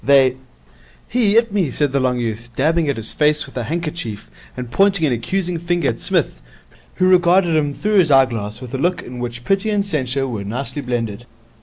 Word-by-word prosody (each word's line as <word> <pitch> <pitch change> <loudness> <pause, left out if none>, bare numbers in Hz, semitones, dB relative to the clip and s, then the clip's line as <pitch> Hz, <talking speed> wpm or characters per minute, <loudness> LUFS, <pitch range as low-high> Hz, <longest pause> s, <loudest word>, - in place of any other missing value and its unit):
They 135 -2 +4 0.3
' - - -29
'He 220 -4 +2
'it 230 -3 +2
me,' 190 -8 +1
said 145 +2 0
the 140 - +1
long 130 -1 +1
youth, 115 0 -4
dabbing 160 +3 +1
at 140 - 0
his 110 -1 -2
face 150 0 +2
with 135 - -15
a 125 -3 -3
handkerchief 155 -8 -4 0.3
and 125 -2 -6
pointing 195 +1 +3
an 135 - +1
accusing 175 - -2
finger 170 -3 0
at 115 - -4
Psmith, - - 0 0.5
who 185 - +2
regarded 175 -1 +4
him 145 -2 +1
through 210 -1 +2
his 170 -4 +3
eyeglass 115 -6 +2
with 125 -1 -9
a 135 - -2
look 175 +4 0
in 125 0 -8
which 120 0 -5
pity 195 +2 +1
and 205 -2 0
censure 135 -6 -1
were 110 -5 -4
nicely 130 +8 -4
blended. 120 -2 -4
140 Hz, 205 wpm, -19 LUFS, 120-175 Hz, 0.5 s, They